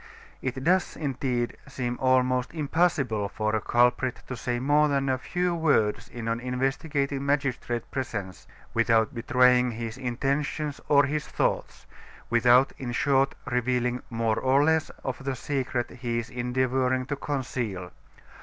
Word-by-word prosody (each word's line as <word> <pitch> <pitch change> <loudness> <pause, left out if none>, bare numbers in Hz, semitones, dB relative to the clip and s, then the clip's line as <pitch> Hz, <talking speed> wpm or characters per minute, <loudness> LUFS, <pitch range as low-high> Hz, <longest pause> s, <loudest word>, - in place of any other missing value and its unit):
It 130 0 -3
does, 180 +4 +2
indeed, 130 -4 -2
seem 125 -3 -3
almost 130 +1 +2
impossible 140 - +1
for 110 +1 -1
a 110 - 0
culprit 125 +1 +2
to 130 - -5
say 120 0 -2
more 145 +3 +3
than 140 -1 0
a 130 -1 +1
few 180 +5 -1
words 150 -11 +1
in 120 -2 -6
an 115 +1 0
investigating 135 +2 -1
magistrate's 135 -4 -1
presence, 105 -8 -5 0.3
without 115 -1 +3
betraying 125 +1 +4
his 115 +1 -5
intentions 140 +4 -2
or 145 -1 +6
his 150 +2 -2
thoughts; - - -2 0.5
without, 120 +3 +5
in 120 -2 -4
short, 135 +2 +2
revealing 125 0 0
more 115 -1 0
or 135 +2 +3
less 160 +1 +2
of 130 0 -4
the 135 -1 -2
secret 130 -2 -2
he 120 -1 -3
is 115 -1 -4
endeavoring 130 +1 0
to 145 +2 -3
conceal. 125 -10 -3
130 Hz, 140 wpm, -27 LUFS, 120-140 Hz, 0.5 s, or